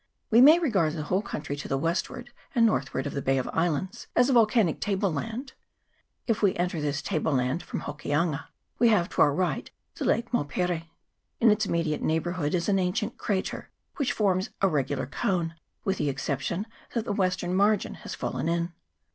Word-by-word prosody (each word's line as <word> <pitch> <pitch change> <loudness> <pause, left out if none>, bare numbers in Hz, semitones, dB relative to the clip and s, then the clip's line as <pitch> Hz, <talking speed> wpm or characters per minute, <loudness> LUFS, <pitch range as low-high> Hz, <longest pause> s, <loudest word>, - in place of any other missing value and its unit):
We 230 +2 +7
may 305 +5 +9
regard 200 - +1
the 155 -2 -3
whole 185 +6 0
country 150 -8 -5
to 145 - -6
the 135 - 0
westward 170 - -2 0.2
and 235 -2 +5
northward 135 - 0
of 145 - -3
the 140 - -2
Bay 135 0 +1
of 130 - -1
Islands 175 +6 -1
as 250 +2 +4
a - - +3
volcanic 220 -7 +4
table 195 -3 0
land. 230 - -4 0.7
If 230 -3 0
we 200 -3 +3
enter 175 -2 -1
this 145 0 -1
table 160 -2 0
land 130 +5 0
from - - -5
Hokianga 150 +1 -1 0.3
we 240 - +6
have 200 -6 +3
to - - 0
our 145 - +6
right 180 +5 -1 0.2
the - - -4
Lake 235 +2 +1
Maupere. 170 -2 -1 0.5
In 230 -2 +6
its 210 0 +1
immediate 165 -3 0
neighbourhood 160 0 0
is 170 -1 -1
an 195 -2 +3
ancient 205 +5 -1
crater, 195 -3 -2 0.3
which 270 -4 +1
forms 195 -1 +1
a 195 - +4
regular 145 -5 0
cone, 165 +4 -1 0.3
with 195 -1 -1
the 145 - +1
exception 140 +7 -2 0.3
that 230 -2 0
the - - -1
western 185 -2 0
margin 205 +2 +2
has - - -8
fallen 165 - -2
in. 170 0 -1
180 Hz, 190 wpm, -27 LUFS, 150-210 Hz, 0.7 s, may